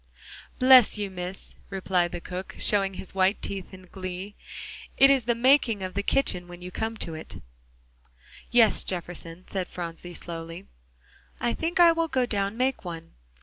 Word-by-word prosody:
"Bless 255 -4 +7
you, 205 -2 -3
Miss," 180 +1 -6 0.2
replied 185 -2 0
the - - -5
cook, 180 +2 -7
showing 195 -2 +2
his 185 - -6
white 190 +1 +2
teeth 195 -2 -4
in 185 -1 -12
glee, 185 +1 -6 0.6
"it 275 0 +7
is 265 -4 +2
the 235 0 +1
making 235 -4 +3
of 185 0 -4
the 200 - -1
kitchen 190 -6 +1
when 175 0 -11
you 180 0 -8
come 220 +3 -3
it." 160 -1 -8 1.1
"Yes, 230 -3 +5
Jefferson," 175 -1 -6
said 185 -2 -3
Phronsie 175 0 -7
slowly, 165 +2 -8 0.7
"I 235 - 0
think 340 +3 -2
I 340 -1 +8
will 330 0 0
go 260 -5 +1
down 200 -2 -2
make 260 +1 0
one. 165 -2 -8
195 Hz, 160 wpm, -26 LUFS, 180-235 Hz, 1.1 s, I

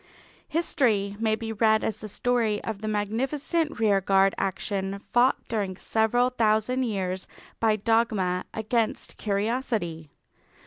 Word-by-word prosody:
History 235 -11 +1
may 220 -1 +2
be 225 0 -5
read 220 0 +3
as 220 - -1
the 215 - -8
story 230 -1 +1
of 215 -3 -4
the 215 - -4
magnificent 265 - -1
rearguard 195 -2 +3
action 195 0 -2
fought 245 +2 +3
during 200 -5 -2
several 245 +4 +1
thousand 225 +2 +1
years 190 -4 -2 0.3
by 220 -2 +3
dogma 210 -4 +1
against 225 +1 -1
curiosity. 205 - -2
220 Hz, 120 wpm, -26 LUFS, 200-235 Hz, 0.3 s, read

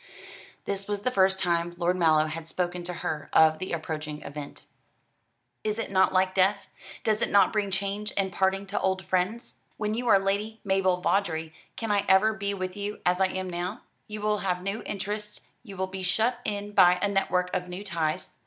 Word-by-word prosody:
This 195 0 -3
was 205 -1 -2
the 255 - 0
first 190 -3 +3
time 170 -1 0
Lord 175 +1 +1
Mallow 160 -3 +4
had 160 +1 -5
spoken 175 0 -2
to 180 - -4
her 150 -2 -3
of 155 0 +5
the 185 - -5
approaching 155 -2 -4
event. 145 0 -8 1.0
"Is 215 0 -1
it 225 - -4
not 190 -1 +4
like 185 0 +2
death? 195 +2 +2 0.4
Does 215 0 +1
it - - +1
not 200 +2 +4
bring 210 -2 0
change 200 +2 -2
and 195 -1 +1
parting 190 +1 +1
to 200 +1 -2
old 190 -1 0
friends? 190 +6 -1 0.2
When 210 0 -1
you 245 +2 -2
are 200 - +7
Lady 200 +3 -1
Mabel 190 -2 +1
Vawdrey, 160 -6 0 0.2
can 225 -2 -3
I 200 -1 +2
ever 190 +3 +5
be 200 -1 -2
with 185 -1 -4
you 205 +1 -4
as 180 +1 +2
I 190 - +5
am 185 0 -4
now? 180 +3 -4 0.3
You 210 -1 -6
will 210 0 +1
have 180 -2 -1
new 200 +3 -2
interests, 210 +1 -4 0.2
you 200 -5 -11
will 190 - 0
be 190 0 -7
shut 220 +7 +1
in 205 0 -3
by 180 -3 +6
a 205 - +1
network 180 -2 0
of 180 0 -2
new 180 +3 -6
ties. 165 -5 -2
190 Hz, 200 wpm, -27 LUFS, 180-205 Hz, 1.0 s, are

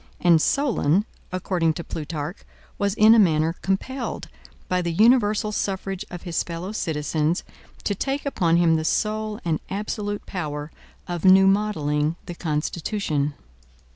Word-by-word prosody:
And 170 -3 +5
Solon, 210 - +2 0.3
according 180 -3 0
to 170 - -5
Plutarch, 155 +2 -5 0.4
was 200 0 0
in 215 +1 +7
a 230 - +6
manner 160 -4 +3
compelled, 245 +7 -3 0.4
by 180 0 +1
the 170 -1 -2
universal 215 +1 +3
suffrage 195 -1 -3
of 175 -1 -8
his 170 -3 -1
fellow 170 +3 -5
citizens, 155 -3 -1 0.4
to 205 - 0
take 270 +8 -2
upon 175 -11 +2
him 165 -2 +4
the 155 - -2
sole 215 +4 -1
and 160 -2 0
absolute 205 +1 -3
power 150 -4 -4 0.4
of 175 -2 -4
new 190 0 +7
modeling 160 -7 +1
the 175 - -6
constitution. 155 -1 -2
180 Hz, 140 wpm, -24 LUFS, 160-210 Hz, 0.4 s, in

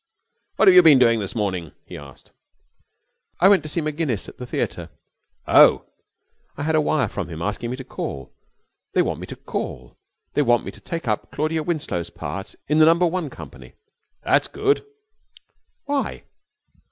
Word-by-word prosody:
'What 215 - +3
have 190 - +9
you 180 - +9
been 160 -5 +7
doing 115 -3 +4
this 100 +1 -5
morning?' 95 -7 -3
he - - -10
asked. 70 -2 -13 1.1
'I 190 - +6
went 200 -2 +5
to 155 - -7
see 170 - -1
Maginnis 150 - -2
at - - -13
the 125 - -7
theatre.' - - -3 0.6
'Oh!' - - +6 0.7
'I 145 - -4
had 160 +1 0
a 155 - +4
wire - - +1
from - - -5
him 80 -1 -7
asking 105 +6 -3
me 125 - -3
to 130 - -7
call. 65 - -6 0.6
They - - +4
want - - -3
me - - -8
to 120 - -3
take 165 -5 -5
up 105 -1 -1
Claudia 155 +2 -1
Winslow's 150 - -3
part 95 -1 -7
in 150 +2 +2
the 155 - +7
number 170 +2 +4
one 170 -3 -2
company.' - - -12 0.5
'That's - - +2
good.' 415 0 0 1.0
'Why?' 285 -1 -2
145 Hz, 160 wpm, -22 LUFS, 105-165 Hz, 1.1 s, have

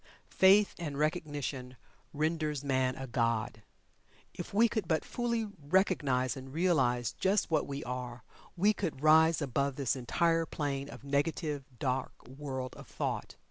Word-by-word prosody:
Faith 195 +2 +5
and 150 -5 -4
Recognition 145 -5 -2 0.3
renders 155 -1 -1
man 130 -2 +1
a 135 - -6
god. 115 -3 -1 0.7
If - - -7
we 225 +4 +5
could 215 -5 -2
but 160 -1 +1
fully 235 -2 -1 0.2
recognize 145 -8 +2
and 135 0 -9
realize 130 - +1
just 195 -1 +1
what 155 -2 +2
we 140 0 -4
are, 125 -1 -5 0.3
we 205 +5 +4
could 165 -9 -4
rise 160 +1 +5
above 140 +1 0
this 135 -2 0
entire 165 +6 +1
plane 140 -2 -3
of - - -10
negative, 145 0 -1
dark 130 0 -1
world 130 -1 -5
of - - -11
thought. - - -3
145 Hz, 140 wpm, -31 LUFS, 130-165 Hz, 0.7 s, Faith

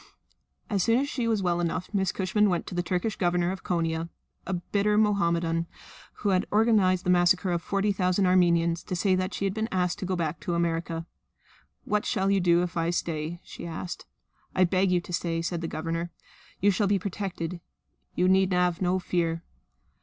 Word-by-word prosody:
As 200 -3 0
soon 230 +5 +3
as 275 +2 +1
she 245 -5 -2
was 220 -4 +1
well 175 -1 +1
enough 175 +3 -2
Miss 190 -2 +1
Cushman 205 +2 +1
went 175 -2 -1
to - - -7
the 175 - 0
Turkish 180 +4 -1
Governor 175 0 +1
of 190 - -7
Konia, 165 -1 -1 0.4
a 190 - -1
bitter 205 +4 0
Mohammedan 170 -5 +1 0.6
who 205 - +2
had 185 -1 +2
organised 205 -4 +3
the 180 - +2
massacre 180 +1 +3
of 170 -1 0
forty 200 +2 0
thousand 185 0 +1
Armenians, 170 -2 +3
to 180 - -3
say 190 +2 +2
that 185 0 0
she 200 - -3
had 195 - 0
been 220 +2 -2
asked 180 -1 0
to 185 - -4
go 185 - 0
back 165 -2 -2
to 175 - -2
America. 165 -1 -1 0.8
"What 210 0 0
shall 195 -3 +1
you 200 - +3
do 175 -1 +3
if 175 - -4
I 165 0 +1
stay?" 170 -1 -3
she - - -9
asked. 170 +2 -6 0.5
"I 185 - +4
beg 185 +1 +2
you 180 -1 +2
to 175 - -9
stay," 170 -1 -1
said 170 0 -2
the 165 - -3
Governor. 165 +2 -3 0.5
"You 205 +2 +4
shall 200 +2 +1
be 200 0 +3
protected. 180 -3 -4 0.5
You 180 - +2
need 190 0 +4
have 180 -1 +1
no 185 0 +2
fear." 170 -2 -1
180 Hz, 200 wpm, -27 LUFS, 170-195 Hz, 0.8 s, I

